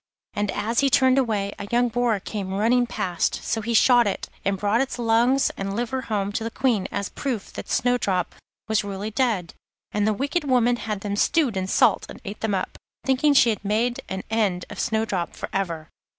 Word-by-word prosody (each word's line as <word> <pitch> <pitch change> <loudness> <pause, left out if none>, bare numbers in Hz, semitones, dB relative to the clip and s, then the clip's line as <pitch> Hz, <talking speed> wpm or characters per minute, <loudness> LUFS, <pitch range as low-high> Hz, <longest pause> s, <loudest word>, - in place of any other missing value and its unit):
And 205 0 -1
as 230 +3 -1
he 275 - +3
turned 260 0 +4
away 205 -5 -1
a 205 - -5
young 240 +1 +3
boar 235 -2 +1
came 195 -1 -4
running 240 +4 +3
past, 180 -7 -1
so 225 - -1
he 230 +2 -1
shot 240 0 +6
it, 200 - -3
and 195 0 0
brought 205 +5 +1
its 270 -2 -2
lungs 240 +3 +3
and 195 0 -4
liver 245 +3 -2
home 205 -4 -2
to 220 - -3
the 225 - -2
Queen 225 -6 0
as 200 -1 -2
a - - -29
proof 245 -8 -4
that - - -7
Snowdrop 205 -8 +1 0.3
was 220 -1 +1
really 200 +1 -4
dead. 220 -7 0 0.4
And 210 0 +1
the 215 - +3
wicked 285 - -1
woman 245 -3 +3
had 210 -4 -4
them 205 -1 -2
stewed 270 +1 +2
in 190 0 -1
salt, - - +3
and - - -9
ate 200 +2 -6
them 220 -3 0
up, 185 - -4 0.3
thinking 270 +2 +3
she 240 -4 +6
had 210 - -5
made 225 +4 0
an 190 0 -4
end 205 -5 +1
of - - -7
Snowdrop 220 -6 -1
for - - -6
ever. 170 -5 -2
220 Hz, 210 wpm, -24 LUFS, 200-245 Hz, 0.4 s, shot